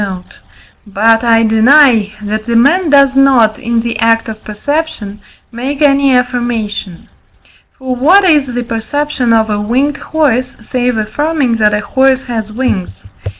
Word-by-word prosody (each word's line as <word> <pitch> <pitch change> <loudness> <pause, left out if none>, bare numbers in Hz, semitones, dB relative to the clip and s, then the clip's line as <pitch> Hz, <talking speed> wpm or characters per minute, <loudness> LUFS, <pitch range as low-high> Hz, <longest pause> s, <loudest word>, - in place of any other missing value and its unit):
note); 190 -3 -7 0.5
but 225 +3 +1
I 230 -1 +3
deny, 225 -1 +3
that 215 +2 -4
a 235 - 0
man 310 +9 +2
does 275 -2 +3
not, 255 -6 +3
in 235 0 -1
the 230 -1 -4
act 225 0 +1
of 215 -1 -8
perception, 215 -3 -4 0.3
make 260 +4 -5
any 280 -2 +3
affirmation. 240 -7 -3 0.7
For 260 -1 -4
what 340 +11 +4
is 300 -6 +2
the 245 -1 -4
perception 245 +3 -3
of 220 -1 +1
a 205 0 -2
winged 265 +7 -1
horse, 260 -6 -2
save 245 +2 -2
affirming 255 +3 -1
that 210 -1 +2
a 210 - -2
horse 265 +3 +1
has 220 -3 -5
wings? 205 - -4
240 Hz, 150 wpm, -12 LUFS, 220-275 Hz, 0.7 s, what